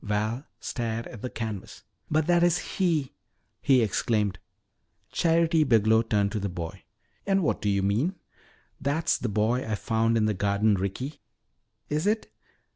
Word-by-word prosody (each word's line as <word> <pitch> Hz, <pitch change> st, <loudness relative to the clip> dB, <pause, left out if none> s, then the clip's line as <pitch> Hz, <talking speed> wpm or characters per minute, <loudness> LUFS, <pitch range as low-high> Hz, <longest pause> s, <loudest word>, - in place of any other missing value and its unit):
Val 110 Hz, +6 st, -2 dB
stared 115 Hz, -1 st, -3 dB
at 120 Hz, -, -10 dB
the 125 Hz, -, -3 dB
canvas._] 110 Hz, -5 st, -6 dB, 0.3 s
"But 155 Hz, 0 st, +2 dB
that 175 Hz, +1 st, +3 dB
is 175 Hz, 0 st, +4 dB
he!" 165 Hz, -8 st, -1 dB, 0.5 s
he 130 Hz, -4 st, +4 dB
exclaimed. 105 Hz, -2 st, 0 dB, 0.7 s
Charity 165 Hz, -1 st, +3 dB
Biglow 110 Hz, -4 st, +4 dB
turned 105 Hz, -3 st, +1 dB
to 105 Hz, -, -2 dB
the 100 Hz, 0 st, -2 dB
boy. 85 Hz, -2 st, -7 dB, 0.4 s
"And 195 Hz, -1 st, +3 dB
what -, -, 0 dB
do 105 Hz, -, 0 dB
you 100 Hz, -1 st, +1 dB
mean 120 Hz, -, +1 dB, 0.3 s
" -, -, -34 dB
"That's 155 Hz, +3 st, +1 dB
the -, -, -2 dB
boy 110 Hz, +5 st, +1 dB
I 110 Hz, -, -2 dB
found 115 Hz, +1 st, +1 dB
in 110 Hz, -, +2 dB
the 110 Hz, -, +1 dB
garden, 100 Hz, +2 st, +2 dB
Ricky!" 100 Hz, +10 st, -3 dB, 0.7 s
"Is 155 Hz, +6 st, -1 dB
it?" 215 Hz, +1 st, 0 dB
115 Hz, 160 wpm, -27 LUFS, 105-155 Hz, 0.7 s, is